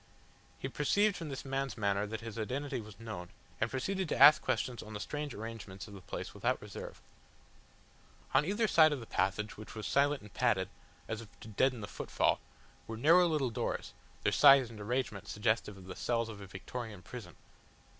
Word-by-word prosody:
He - - -4
perceived 200 +10 +2
from 165 -5 -5
this 135 0 -6
man's 135 -1 -2
manner 100 -1 +1
that 110 +1 -5
his 115 0 -6
identity 130 +3 -2
was 105 -2 -12
known, 105 -6 -6 0.3
and 110 - +1
proceeded 185 +8 -2
to - - 0
ask 150 - +9
questions 125 -3 -1
on 110 - -9
the 105 - -4
strange 150 +5 -4
arrangements 105 -3 -7
of 105 - -11
the 100 - -10
place - - -6
without - - 0
reserve. - - -8 1.3
On - - +5
either 205 +7 +1
side 155 -5 +6
of 145 - -3
the 115 - -8
passage, 100 +1 -1
which 110 +1 -10
was 110 -2 -5
silent 140 +1 +2
and 105 - -13
padded, 105 -7 +2 0.4
as 115 0 -3
if 110 -3 -15
to - - -9
deaden 125 +3 +1
the 100 - -5
footfall, - - 0 0.5
were 110 - -5
narrow 170 +8 +6
little 150 -7 +1
doors, 115 0 -3 0.3
their - - +3
size 135 -4 +7
and 110 - -10
arrangement 115 -2 -2
suggestive 105 -1 0
of 95 - -12
the 95 0 -7
cells 115 -1 0
of 105 -2 -8
a 100 - -8
Victorian 105 +1 -7
prison. - - -9
115 Hz, 195 wpm, -33 LUFS, 105-140 Hz, 1.3 s, ask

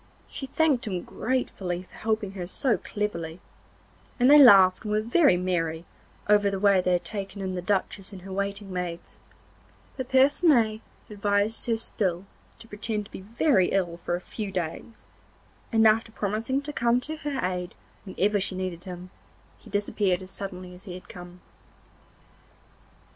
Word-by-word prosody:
She 270 - -5
thanked 275 -4 +1
him 185 -4 -3
gratefully 190 -8 -2
for - - -23
helping 215 -3 -2
her 185 -3 -6
so 245 +5 +1
cleverly, 170 -5 -4 0.8
and 250 +3 +5
they 295 - +9
laughed 195 -7 +8
and 210 - -5
were 210 - +2
very 235 - +4
merry 170 -2 -1 0.4
over 205 -1 +4
the 195 - -2
way 200 -2 +4
they 180 0 +1
had 175 - 0
taken 200 -1 -6
in 190 -1 -3
the 180 - -3
Duchess 195 +1 -1
and 185 -3 -10
her 190 0 -7
waiting 200 0 -3
maids; 175 -1 -5 0.8
but 260 -2 -5
Percinet 265 -5 +4 0.3
advised 205 +2 -1
her 230 -1 +1
still 190 -5 -2 0.3
to 225 - -14
pretend 210 0 -3
to - - -17
be 190 - -9 0.5
ill 180 -3 0
for 175 0 -3
a 175 - -5
few 205 +1 -6
days, 180 +5 -5 0.7
and 225 0 +4
after 225 +1 +2
promising 220 +7 -2
to 295 +1 -6
come 235 -1 +2
to 310 +5 -5
her 290 -3 -4
aid 180 -1 -3 0.3
whenever 200 +2 0
she 190 0 -1
needed 185 -2 -4
him, 180 0 -8 0.5
he 225 - -16
disappeared 200 -2 0
as 185 - -9
suddenly 185 -2 -7
as 180 +3 -12
he 180 -3 -7
had 180 - -12
come. 180 0 -11
200 Hz, 165 wpm, -26 LUFS, 180-225 Hz, 0.8 s, they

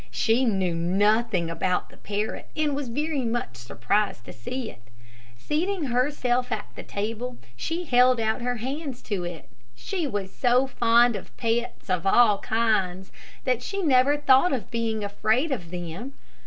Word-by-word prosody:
She 235 +3 +2
knew 190 -6 +1
nothing 195 +2 +2
about 180 +2 -1
the - - -17
parrot 210 +1 -4
and 300 -2 +1
was 285 -2 -3
very 290 +3 -1
much 230 - -2
surprised 125 - -1
to - - -9
see 225 - -5
it. 110 - -19 0.6
Seating 335 - -1
herself 250 -1 0
at - - -2
the - - -8
table, 225 +4 -4 0.2
she 330 - -3
held 250 -4 +4
out 220 +2 0
her 245 +1 -1
hands 265 +2 -5
to 200 -5 -2
it. 175 -2 -7 0.3
She 340 - -3
was 200 -6 -4
so 250 +1 +3
fond 235 -2 +4
of 195 - -9
pets 235 0 -1
of 185 -1 0
all 210 -1 +5
kinds, 195 -5 0 0.3
that 250 -2 +1
she 395 +9 -3
never 280 -1 +4
thought 275 +3 +4
of 255 -2 -3
being 225 -2 -1
afraid 220 +8 +1
of 180 -11 -3
them. 175 +9 -6
235 Hz, 160 wpm, -26 LUFS, 200-260 Hz, 0.6 s, all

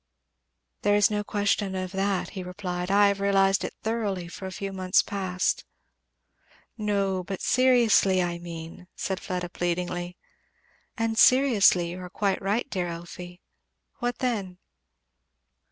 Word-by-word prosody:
"There 205 0 +3
is 205 0 +4
no 210 0 -1
question 205 -1 0
of 185 -1 -3
that," 195 0 -1
he 190 - -6
replied. 180 -1 -4
"I 200 +1 +5
have 200 0 -1
realized 195 -1 +3
it - - -5
thoroughly 210 -6 -2
for 190 +2 -7
a - - -6
few 195 +1 -5
months 185 0 +2
past." 185 -2 -1 1.1
"No, 200 -4 0
but 190 +1 -5
seriously, 240 -7 +4
I 175 -1 -1
mean," 170 +1 -9
said 190 -1 -3
Fleda 180 -1 -4
pleadingly. 175 0 -3 0.8
"And 225 -1 0
seriously 215 -10 +5
you 180 - -7
are 180 0 -8
quite 195 +1 -1
right, 205 +5 0
dear 180 -2 -2
Elfie. 175 +1 -8 0.6
What 245 -1 -2
then?" 205 -8 -2
190 Hz, 135 wpm, -26 LUFS, 180-205 Hz, 1.1 s, I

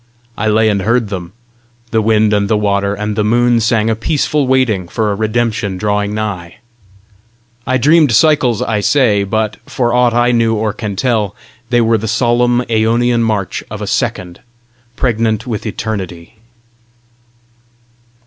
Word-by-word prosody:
I 110 - -2
lay 110 +1 +3
and 100 -2 +1
heard 115 +2 0
them: 90 -3 -6 0.6
the 110 - +2
wind 110 -1 +2
and 100 -1 +1
the 110 - +2
water 100 -1 0
and 105 +1 -3
the 105 - 0
moon 120 +2 +2
sang 115 -1 +1
a 115 - +1
peaceful 145 +3 0
waiting 125 -9 +1
for 105 +3 -1
a - - -1
redemption 110 -2 -1
drawing 105 +1 -1
nigh. 95 -6 -4 1.1
I 130 - +2
dreamed 150 +1 +4
cycles, 145 -6 +3
I 110 -2 -1
say, 105 -3 +2
but, 110 +1 -2
for 120 -2 -1
aught 125 -1 +2
I 120 +1 +3
knew 115 -1 +2
or 110 -1 -1
can 105 -2 -5
tell, 105 -3 -1 0.3
they 120 -1 +3
were 115 -1 +2
the 110 - -4
solemn, 120 +2 +1
æonian 115 +1 +1
march 105 -5 -2
of - - -7
a - - -4
second, 90 -1 -3 0.6
pregnant 115 -2 0
with 115 -3 -4
eternity. 95 -6 -5
110 Hz, 155 wpm, -15 LUFS, 105-120 Hz, 1.1 s, dreamed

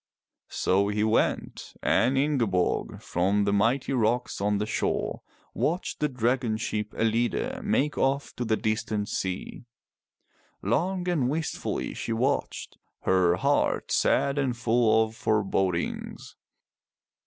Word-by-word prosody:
So 100 +2 +1
he 105 +1 0
went, 110 +1 0
and 130 +4 +3
Ingeborg, 120 -11 0
from 100 +4 +1
the 100 0 +1
mighty 115 +7 +1
rocks 120 -1 0
on 105 0 +1
the 105 - -1
shore, 110 - -2 0.3
watched 175 +4 -1
the 150 - +1
dragon 125 -2 0
ship 105 -1 -3
EUide 115 +2 0
make 150 +2 0
off 140 +1 0
to 125 - -1
the 110 -2 +1
distant 110 -1 -1
sea. 95 +5 -4 1.0
Long 175 - 0
and 150 -8 +1
wistfully 155 +2 -3
she 115 - -3
watched, 130 +5 -2 0.2
her 90 -2 +3
heart 140 +7 +1
sad 140 +1 +2
and 130 -4 0
full 115 -1 +3
of 110 0 -11
forebodings. 95 -5 -1
115 Hz, 120 wpm, -27 LUFS, 105-135 Hz, 1.0 s, and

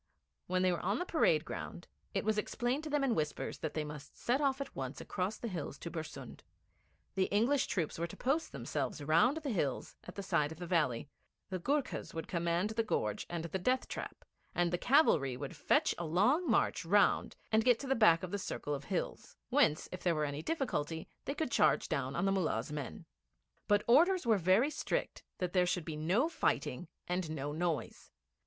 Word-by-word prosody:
When 185 0 +1
they 185 - +4
were 175 - -1
on 200 +5 0
the 360 - -2
parade 165 - +3
ground, 175 - -6 0.3
it 195 - 0
was 215 0 +2
explained 245 +7 -1
to - - -4
them 295 -1 +1
in 265 -3 +2
whispers 150 -6 -2
that 155 - -4
they 155 - 0
must 150 -1 -9
set 255 +4 +1
off 275 -1 +2
at 275 - -6
once 135 0 -4
across 195 +3 -3
the 235 - -5
hills 165 -8 -5
to 170 - -7
Bersund. 155 -6 -7 0.7
The 190 -1 +2
English 235 +8 +2
troops 170 -7 -2
were 170 - -1
to - - -11
post 300 +5 0
themselves 150 - -3
round 165 - +4
the 300 -4 -3
hills 145 - -2
at 180 - -9
the 200 - -5
side 165 -6 +1
of 160 - -8
the 175 - -6
valley; 155 -8 +1 0.4
the 185 - -2
Goorkhas 280 - -1
would 160 -1 -4
command 170 +4 0
the 225 +1 +1
gorge 105 - -1
and 170 -1 -3
the 190 +3 -3
death 255 +7 +1
trap, - - -7 0.3
and 175 0 +1
the 175 - +1
cavalry 160 - +4
would - - -6
fetch - - +2
a 170 - -2
long 245 - +2
march 225 - +2
round 200 +5 +3 0.2
and 220 0 +4
get 245 -1 +5
to 275 - -5
the 270 - +3
back 215 -9 +5
of 180 - -4
the 205 - -1
circle 150 -5 -3
of 140 -1 -4
hills, - - -4
whence, 150 - +3
if 185 - -6
there 175 -2 +2
were 155 -1 +1
any 145 +1 -3
difficulty, 160 - -2 0.2
they 280 - -2
could 315 - -2
charge - - +3
down - - -2
on - - 0
the 195 - +3
Mullah's 155 -11 0
men. 135 - -5 0.6
But 205 0 +4
orders 345 +8 +5
were 220 -3 +4
very 190 - +4
strict - - -2 0.2
that 180 -1 -2
there 180 -1 +4
should 175 -2 -1
be 160 - -4
no 180 - +2
fighting 335 - -1 0.2
and 180 -2 -1
no 145 -2 -3
noise. 160 -4 -2
180 Hz, 210 wpm, -34 LUFS, 155-240 Hz, 0.7 s, get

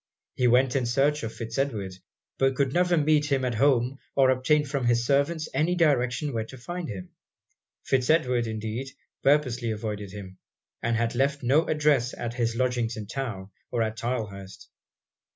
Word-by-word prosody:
He 125 - +2
went 125 +2 +3
in 130 -3 +1
search 140 +5 +2
of 115 - -4
Fitz 115 +2 -5
Edward; 105 -9 -2 0.5
but 135 0 +2
could 135 -1 0
never 180 0 +3
meet 150 -1 +2
him 135 -2 +2
at 125 - -1
home 130 +1 +2 0.2
or 135 -1 +5
obtain 145 +4 +2
from 140 -2 -2
his 120 0 +2
servants 145 +4 +1
any 170 +4 +1
direction 140 -4 +1
where 110 -1 -2
to 130 - -11
find 175 +6 -6
him. 95 -4 -7 0.7
Fitz 130 -2 +1
Edward, 125 -7 +2
indeed, 110 +4 -4 0.3
purposely 130 -5 +2
avoided 105 -2 -4
him, 95 -2 -10 0.4
and 115 0 0
had 115 0 0
left 140 +3 0
no 140 +7 +3
address 145 -5 +2
at 120 -1 -4
his 115 -2 -1
lodgings 120 -2 0
in 105 - -5
town, 105 -5 -5 0.2
or 120 -2 0
at 110 0 -3
Tylehurst. 105 -5 -5
125 Hz, 170 wpm, -26 LUFS, 115-140 Hz, 0.7 s, or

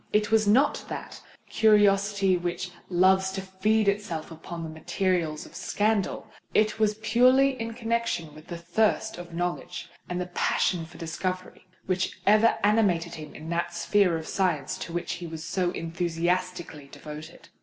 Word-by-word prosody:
It 210 0 +1
was 220 -1 +4
not 260 +8 +3
that - - -7 0.3
curiosity 200 -3 +4
which 175 +1 -3 0.2
loves 190 +1 +4
to 195 - -3
feed 205 +3 +1
itself 200 -6 -1
upon 165 +1 -7
the 160 - -5
materials 175 -6 0
of - - -15
scandal. 210 -2 0 0.3
It 215 0 +3
was 215 -1 +2
purely 255 +5 +5
in 230 0 -4
connexion 230 -9 -1
with 155 +1 -14
the 170 - -5
thirst 205 +2 0
of 175 -1 -9
knowledge 175 0 -3 0.2
and 180 0 -2
the 180 - -2
passion 175 -1 0
for 170 - -14
discovery 185 +3 -4 0.2
which 185 0 -1
ever 215 +2 +5
animated 195 -6 +2
him 155 -2 -9
in 155 +1 -8
that 170 0 -1
sphere 185 -1 +2
of 160 - -7
science 180 -4 0
to - - -6
which 175 0 -3
he 170 - -5
was 160 -1 -7
so 180 0 0
enthusiastically 170 -2 -2
devoted. 155 +2 -10
185 Hz, 155 wpm, -27 LUFS, 170-210 Hz, 0.3 s, purely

